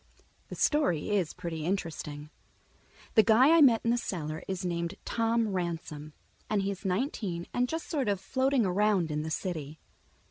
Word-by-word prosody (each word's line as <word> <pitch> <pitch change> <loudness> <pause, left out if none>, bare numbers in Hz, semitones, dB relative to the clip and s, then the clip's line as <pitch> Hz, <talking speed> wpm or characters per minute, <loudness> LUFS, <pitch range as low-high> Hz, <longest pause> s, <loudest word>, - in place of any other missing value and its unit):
The - - -6
story 280 - +1
is 190 -6 0
pretty 165 -2 -5
interesting. 155 -4 -4 0.8
The 220 - +7
guy 235 +9 +5
I 335 - +6
met 240 -6 +6
in 230 - +2
the 240 - +2
cellar 155 -7 -4
is 190 -1 -3
named 170 -1 -2
Tom 230 -1 +1
Ransom, 165 -5 -4 0.4
and 205 -2 +1
he 200 - 0
is 195 0 -8
nineteen 190 - -2
and 245 0 +1
just 325 0 -4
sort 275 -9 -1
of 200 -2 0
floating 260 +4 +1
around 190 -3 +2
in 150 0 -1
the 160 - -4
city. 160 -3 -4
190 Hz, 170 wpm, -29 LUFS, 165-230 Hz, 0.8 s, The